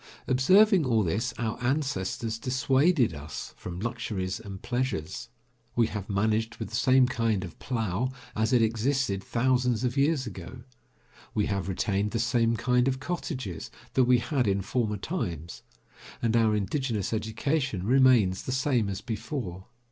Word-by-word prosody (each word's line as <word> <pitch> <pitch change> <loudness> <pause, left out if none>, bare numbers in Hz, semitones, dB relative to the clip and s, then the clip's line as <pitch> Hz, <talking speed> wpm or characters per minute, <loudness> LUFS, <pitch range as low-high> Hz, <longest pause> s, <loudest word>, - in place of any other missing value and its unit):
Observing 185 - +5
all 115 -5 +2
this, 105 +8 -1
our 115 +1 -3
ancestors 120 -5 -1
dissuaded 130 - +2
us 75 0 -7
from 90 -1 -7
luxuries 105 -4 -3
and 100 -4 -9
pleasures. 120 -3 -2 0.5
We 120 - +4
have 105 -1 -5
managed 110 +3 0
with - - -6
the 110 - -5
same 130 +2 +5
kind 115 -5 0
of 85 - -9
plough 115 -1 -1 0.3
as 110 +1 +1
it 120 -3 +5
existed 115 -2 0
thousands 125 0 +1
of 125 0 0
years 140 -1 +2
ago. 105 +3 -8 0.7
We 105 - +2
have 100 -2 -2
retained 100 +2 0
the 115 - 0
same 115 -1 +2
kind 125 +1 +2
of 130 -1 0
cottages 130 - -4 0.2
that 130 - +4
we 125 0 +5
had 125 0 0
in 100 0 +1
former 110 0 -1
times, 85 - -4 0.6
and 115 -1 +1
our 110 -2 +4
indigenous 105 0 -1
education 110 - -1
remains 120 -6 +4
the - - -2
same 130 -5 +1
as 95 0 -4
before. 110 - -5
115 Hz, 150 wpm, -28 LUFS, 100-130 Hz, 0.7 s, Observing